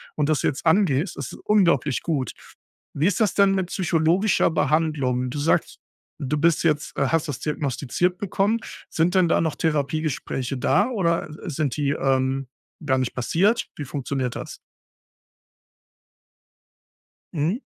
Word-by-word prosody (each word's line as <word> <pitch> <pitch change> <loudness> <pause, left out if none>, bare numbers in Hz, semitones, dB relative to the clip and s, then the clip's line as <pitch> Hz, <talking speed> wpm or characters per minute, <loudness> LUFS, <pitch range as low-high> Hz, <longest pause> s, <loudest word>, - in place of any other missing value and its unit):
und 150 -1 0
das 155 - +2
jetzt 140 - -1
angehst, 165 -2 +2
das - - -5
ist - - -11
unglaublich 170 - +2
gut. 140 -8 -1 0.6
Wie 155 +6 +1
ist 205 +3 0
das 210 - +3
denn 200 -1 +4
mit 190 -2 -1
psychologischer 175 +3 +2
Behandlung? 150 -6 +1
Du 145 - -4
sagst, 150 +3 0 0.4
du 145 +2 -1
bist 165 +1 +2
jetzt, 150 -1 0
äh - - +2
hast 165 0 0
das 140 - -4
diagnostiziert 150 +4 -1
bekommen. 205 +4 0 0.3
Sind 170 +3 +1
denn 185 -3 +4
da - - +3
noch 160 -2 -1
Therapiegespräche 145 -3 -1
da 205 - +2
oder, 170 -9 0
äh, 155 +3 -8
sind 145 -2 -2
die, 145 -2 +1
ähm, 135 -1 0 0.4
gar 130 -3 +2
nicht 130 -2 -1
passiert? 185 - +1
Wie 145 - -5
funktioniert 135 -3 -3
das? - - -7 2.8
Mhm. 170 - 0
155 Hz, 145 wpm, -23 LUFS, 140-175 Hz, 2.8 s, denn